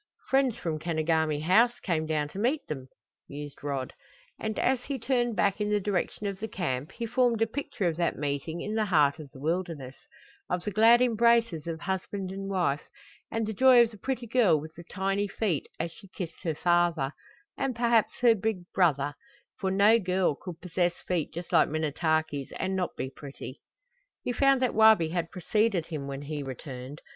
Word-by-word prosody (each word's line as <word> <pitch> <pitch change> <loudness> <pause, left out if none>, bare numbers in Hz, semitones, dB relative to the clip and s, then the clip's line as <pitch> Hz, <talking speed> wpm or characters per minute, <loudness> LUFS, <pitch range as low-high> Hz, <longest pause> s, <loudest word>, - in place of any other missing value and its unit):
"Friends 265 -3 +3
from 160 -7 -3
Kenogami 160 -2 0
House 230 +8 +4
came 160 -4 -1
down 155 -2 0
to 190 - -7
meet 265 +7 0
them," 135 -4 -6 0.4
mused 145 0 -8
Rod, 135 -3 -3 0.5
and 220 -1 -3
as 255 -2 +1
he 275 -1 -3
turned 240 -1 0
back 200 +3 +1
in 210 - 0
the 210 0 +2
direction 200 +1 -2
of 200 -1 -3
the 220 - -3
camp 145 -9 -3
he 235 - -4
formed 240 -1 +2
a 225 - +4
picture 265 -2 -4
of 165 -2 -1
that 170 -1 0
meeting 145 +3 -3
in 210 - -3
the 220 -1 +1
heart 150 -6 +3
of 150 -3 -9
the 130 - -14
wilderness, 160 -4 -2 0.6
of 180 -1 -1
the 210 - -3
glad 230 +4 +6
embraces 230 -8 +3
of 165 -1 -4
husband 190 0 -3
and 195 0 -5
wife, 175 -7 +1 0.5
and 225 0 -1
the 220 - -3
joy 255 +4 +6
of 230 - -2
the 215 - -12
pretty 255 +1 -3
girl 225 -9 +3
with 155 +2 -9
the 170 - -11
tiny 195 +2 -1
feet 195 -7 -1
as 165 +1 -2
she 195 - -15
kissed 175 -3 -7
her 165 -4 -2
father, 175 -5 +2 0.4
and 265 -3 -2
perhaps 235 -2 +2
her 240 -2 +7
big 215 -3 -2
brother; 145 -6 +2 0.5
for 190 - 0
no 205 +4 +5
girl 185 -4 +1
could 170 +3 -9
possess 175 0 0
feet 175 -5 -1
just 170 +1 -7
like 165 -3 +5
Minnetaki's 155 -2 -1
and 190 +1 -1
not 180 -2 -2
be 130 - -4
pretty! 140 -1 -9 0.6
He - - -1
found 275 +1 +3
that 250 - +1
Wabi 220 -7 +6
had 170 0 -2
preceded 195 -1 0
him 150 -5 -5
when 140 0 -5
he 150 0 -4
returned. 130 +1 -7
180 Hz, 190 wpm, -28 LUFS, 155-220 Hz, 0.6 s, her